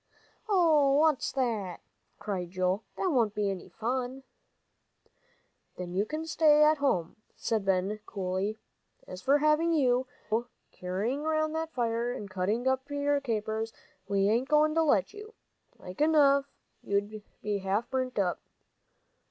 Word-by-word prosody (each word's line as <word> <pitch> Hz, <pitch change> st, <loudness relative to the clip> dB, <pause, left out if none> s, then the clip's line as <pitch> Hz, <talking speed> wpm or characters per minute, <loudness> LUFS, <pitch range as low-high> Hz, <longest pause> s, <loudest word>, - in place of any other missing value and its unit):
"Hoh! 320 Hz, -9 st, +4 dB
what's 305 Hz, -1 st, +2 dB
that!" 220 Hz, -9 st, -2 dB, 0.4 s
cried 185 Hz, -4 st, -4 dB
Joel; 185 Hz, +3 st, 0 dB
"that 375 Hz, -, 0 dB
won't 230 Hz, -7 st, +1 dB
be 205 Hz, -1 st, 0 dB
any 190 Hz, -, -7 dB
fun." 255 Hz, +3 st, -3 dB, 1.5 s
"Then 180 Hz, -1 st, -6 dB
you 200 Hz, +3 st, 0 dB
can 310 Hz, +1 st, -4 dB
stay 305 Hz, -2 st, +5 dB
at 305 Hz, 0 st, +4 dB
home," 180 Hz, -13 st, 0 dB, 0.2 s
said 220 Hz, -3 st, -1 dB
Ben, 195 Hz, +2 st, 0 dB
coolly. 190 Hz, +2 st, -2 dB, 0.5 s
"As 185 Hz, 0 st, -8 dB
for 275 Hz, +2 st, +4 dB
having 305 Hz, +3 st, +3 dB
you, 255 Hz, -4 st, +2 dB, 0.2 s
Joe, 235 Hz, +2 st, 0 dB, 0.3 s
careering 200 Hz, +10 st, -2 dB
round 310 Hz, 0 st, 0 dB
that 320 Hz, 0 st, -3 dB
fire, 235 Hz, 0 st, 0 dB
and 205 Hz, -4 st, -7 dB
cutting 205 Hz, +7 st, -1 dB
up 265 Hz, +1 st, 0 dB
your 285 Hz, 0 st, 0 dB
capers, 220 Hz, -2 st, -2 dB, 0.3 s
we 200 Hz, 0 st, +2 dB
ain't 235 Hz, +6 st, +1 dB
goin' 305 Hz, 0 st, +4 dB
to 325 Hz, -, +3 dB
let 280 Hz, -, +2 dB
you. 425 Hz, +2 st, -11 dB, 0.4 s
Like 180 Hz, +8 st, -8 dB
enough 285 Hz, -3 st, +5 dB, 0.4 s
you'd 205 Hz, +2 st, -2 dB, 0.2 s
be 205 Hz, -1 st, -1 dB
half 195 Hz, +5 st, -1 dB
burnt 255 Hz, -1 st, -2 dB
up." 185 Hz, -3 st, 0 dB
240 Hz, 145 wpm, -29 LUFS, 200-295 Hz, 1.5 s, stay